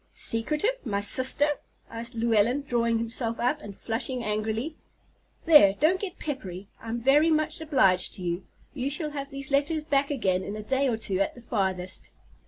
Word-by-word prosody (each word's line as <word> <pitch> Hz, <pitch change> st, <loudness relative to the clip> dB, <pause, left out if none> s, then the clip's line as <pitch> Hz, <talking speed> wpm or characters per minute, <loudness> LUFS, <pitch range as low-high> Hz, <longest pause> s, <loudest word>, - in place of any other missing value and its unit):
"Secretive! 300 Hz, -, +1 dB
My 200 Hz, -5 st, -1 dB
sister?" 260 Hz, +7 st, +2 dB, 0.3 s
said 230 Hz, +1 st, -2 dB
Llewellyn, 230 Hz, +4 st, +2 dB
drawing 235 Hz, -3 st, +1 dB
himself 230 Hz, 0 st, -2 dB
up 255 Hz, +5 st, 0 dB
and 200 Hz, -8 st, -10 dB
flushing 240 Hz, +2 st, 0 dB
angrily. 220 Hz, +8 st, -2 dB, 0.7 s
"There, 295 Hz, -, +7 dB
don't 345 Hz, +6 st, +3 dB
get 380 Hz, -3 st, -6 dB
peppery. 200 Hz, -, -6 dB
I'm 230 Hz, +1 st, -4 dB
very 285 Hz, +6 st, +4 dB
much 310 Hz, +1 st, 0 dB
obliged 195 Hz, -, +2 dB
to 185 Hz, -, -8 dB
you. 175 Hz, +1 st, -2 dB, 0.3 s
You 270 Hz, -1 st, -2 dB
shall 300 Hz, +1 st, -3 dB
have 280 Hz, -1 st, -5 dB
these 275 Hz, 0 st, -8 dB
letters 295 Hz, +3 st, +1 dB
back 280 Hz, -2 st, +1 dB
again 190 Hz, -10 st, 0 dB
in 205 Hz, -, -5 dB
a 215 Hz, -, -6 dB
day 265 Hz, +5 st, +1 dB
or 235 Hz, -3 st, 0 dB
two 200 Hz, -4 st, -1 dB
at 195 Hz, -, 0 dB
the 245 Hz, -, -12 dB
farthest." 190 Hz, -5 st, -2 dB
240 Hz, 175 wpm, -27 LUFS, 215-290 Hz, 0.7 s, There